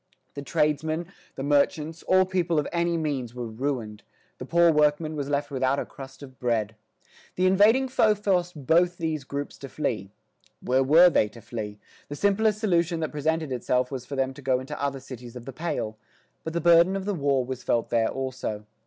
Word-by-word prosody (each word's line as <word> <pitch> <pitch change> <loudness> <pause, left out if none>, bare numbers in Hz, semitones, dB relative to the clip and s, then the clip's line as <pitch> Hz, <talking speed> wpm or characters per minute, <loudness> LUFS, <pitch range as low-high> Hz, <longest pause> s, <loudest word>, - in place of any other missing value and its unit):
The 140 - -6
tradesmen, 155 +2 0 0.3
the 135 - -5
merchants, 150 +3 +1
all 185 0 +4
people 180 -3 0
of 150 - +1
any 170 0 0
means 135 -7 -3
were 125 -1 -4
ruined; 115 -2 -4 0.4
the 130 - -7
poor 170 +1 +5
workman 150 +1 +2
was 140 -2 -3
left 145 0 -1
without 130 0 +1
a - - -2
crust 135 0 -11
of 130 -2 -13
bread. 110 -3 -1 0.6
The 185 - +1
invading 210 +8 +5
foe 215 -4 +3
forced 180 -7 -1
both 175 +3 +3
these 160 -3 -2
groups 140 +2 -6
to 135 - -8
flee. 110 -11 -3 0.5
Where 130 +1 +1
were 165 +7 +6
they 105 - +3
to 115 - -13
flee? 110 -2 -6 0.3
The 145 - -5
simplest 205 +4 +2
solution 175 -5 +1
that 155 - -2
presented 155 0 -1
itself 125 +1 0
was 130 -2 -6
for 140 - -5
them 135 0 0
to 140 - -12
go 130 -1 +1
into 140 +3 -7
other 140 -1 -1
cities 125 -2 -10
of 120 -1 -9
the 135 - -7
"Pale." 115 -9 -3 0.4
But 160 - -5
the 170 - -1
burden 170 +3 +5
of 195 -1 -3
the 205 - -1
war 140 -6 +1
was 130 0 -5
felt 115 - 0
there 115 -1 +2
also. 130 -5 -4
145 Hz, 195 wpm, -26 LUFS, 130-170 Hz, 0.6 s, were